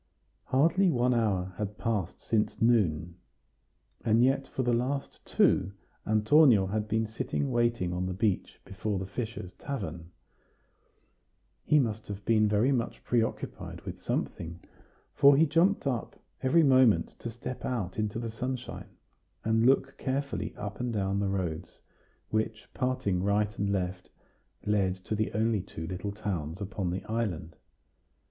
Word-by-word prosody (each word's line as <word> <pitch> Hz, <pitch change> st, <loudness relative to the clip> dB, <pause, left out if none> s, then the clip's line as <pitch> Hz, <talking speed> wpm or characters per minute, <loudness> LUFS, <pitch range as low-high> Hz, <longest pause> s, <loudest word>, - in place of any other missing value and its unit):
Hardly 165 Hz, +9 st, +3 dB
one 125 Hz, -4 st, +2 dB
hour 95 Hz, -6 st, 0 dB
had 105 Hz, 0 st, -3 dB
passed 105 Hz, -8 st, -2 dB
since 110 Hz, -2 st, 0 dB
noon, 90 Hz, -8 st, +2 dB, 0.9 s
and 115 Hz, +1 st, +4 dB
yet 135 Hz, +1 st, +2 dB
for 130 Hz, -, -2 dB
the 120 Hz, -1 st, +2 dB
last 135 Hz, +4 st, -2 dB
two 95 Hz, +2 st, +3 dB, 0.3 s
Antonio 110 Hz, 0 st, +5 dB
had 105 Hz, +2 st, -2 dB
been 110 Hz, +1 st, +1 dB
sitting 115 Hz, +5 st, -2 dB
waiting 120 Hz, -7 st, +1 dB
on 90 Hz, +1 st, -1 dB
the 95 Hz, -, -2 dB
bench 100 Hz, 0 st, -1 dB
before 100 Hz, +1 st, -3 dB
the 95 Hz, -, -3 dB
fishers' 105 Hz, -3 st, -5 dB
tavern. 85 Hz, -, -5 dB, 1.6 s
He 150 Hz, -, +4 dB
must 110 Hz, -6 st, 0 dB
have 100 Hz, 0 st, -7 dB
been 110 Hz, -2 st, +4 dB
very 105 Hz, +6 st, +3 dB
much 120 Hz, -4 st, -2 dB
preoccupied 115 Hz, -2 st, -2 dB
with -, -, -8 dB
something, 85 Hz, +1 st, -3 dB, 0.5 s
for 140 Hz, 0 st, +6 dB
he 160 Hz, -, +6 dB
jumped 165 Hz, +6 st, +2 dB
up 125 Hz, -4 st, -2 dB, 0.2 s
every 160 Hz, +6 st, +4 dB
moment 130 Hz, -6 st, +5 dB
to 120 Hz, -, -5 dB
step 120 Hz, +2 st, -7 dB
out 110 Hz, -6 st, -2 dB
into 105 Hz, 0 st, -1 dB
the 115 Hz, -1 st, -3 dB
sunshine, 125 Hz, +2 st, -5 dB, 0.6 s
and 115 Hz, +1 st, +3 dB
look 135 Hz, 0 st, +2 dB
carefully 135 Hz, -6 st, -2 dB
up 105 Hz, 0 st, -6 dB
and 125 Hz, -1 st, -1 dB
down 100 Hz, -2 st, 0 dB
the 100 Hz, -1 st, 0 dB
roads, 90 Hz, -3 st, -3 dB, 0.5 s
which, 110 Hz, 0 st, -1 dB
parting 125 Hz, -8 st, 0 dB
right 105 Hz, +2 st, +1 dB
and 100 Hz, 0 st, 0 dB
left, 90 Hz, -1 st, -2 dB, 0.6 s
lead 100 Hz, -3 st, +2 dB
to 95 Hz, +3 st, -6 dB
the 110 Hz, 0 st, 0 dB
only 110 Hz, -1 st, +1 dB
two 80 Hz, -3 st, -7 dB
little 95 Hz, +3 st, -4 dB
towns 90 Hz, -5 st, -4 dB
upon 100 Hz, -2 st, -3 dB
the 90 Hz, +2 st, -3 dB
island. 95 Hz, -9 st, -3 dB
110 Hz, 145 wpm, -29 LUFS, 95-125 Hz, 1.6 s, for